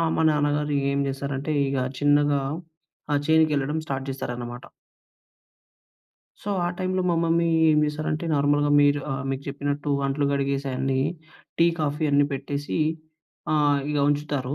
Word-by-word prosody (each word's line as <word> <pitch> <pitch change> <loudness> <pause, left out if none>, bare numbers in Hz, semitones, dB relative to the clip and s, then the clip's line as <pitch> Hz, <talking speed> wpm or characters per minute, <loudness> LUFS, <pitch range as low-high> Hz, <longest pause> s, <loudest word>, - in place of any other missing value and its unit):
మా 160 - +1
నాన్నగారు 145 0 0 0.2
ఏం 140 - 0
జేసారంటే 140 +2 -3
ఇగ 135 0 -1 0.2
చిన్నగా 145 -1 +3 0.7
ఆ - - +3
చేనుకెళ్ళడం 155 -2 +2
స్టార్ట్ 135 -2 -3
జేసారన్నమాట. 120 -2 -5 1.8
సో, 205 - -8 0.2
ఆ - - +1
టైంలో 185 0 -1
మా 170 - +2
మమ్మీ 165 0 +2 0.2
ఏం 150 - +4
జేసారంటే, 155 +2 -2
నార్మల్‌గా 145 +1 +2
మీరు 145 0 +3
ఆహ్, 135 0 -4
మీకు 135 +1 -3
జెప్పినట్టు 145 +1 -3 0.2
అంట్లు 140 +1 0
కడిగేసి 140 0 -1
అయన్ని 130 +1 0 0.6
టీ, 170 - +5
కాఫీ 150 +1 -1
అన్నీ 145 0 +4
పెట్టేసి 140 +3 -3 0.7
ఆహ్, 145 -2 +3
ఇగ 145 - 0
ఉంచుతారు. 145 -2 -1
145 Hz, 130 wpm, -25 LUFS, 140-150 Hz, 1.8 s, టీ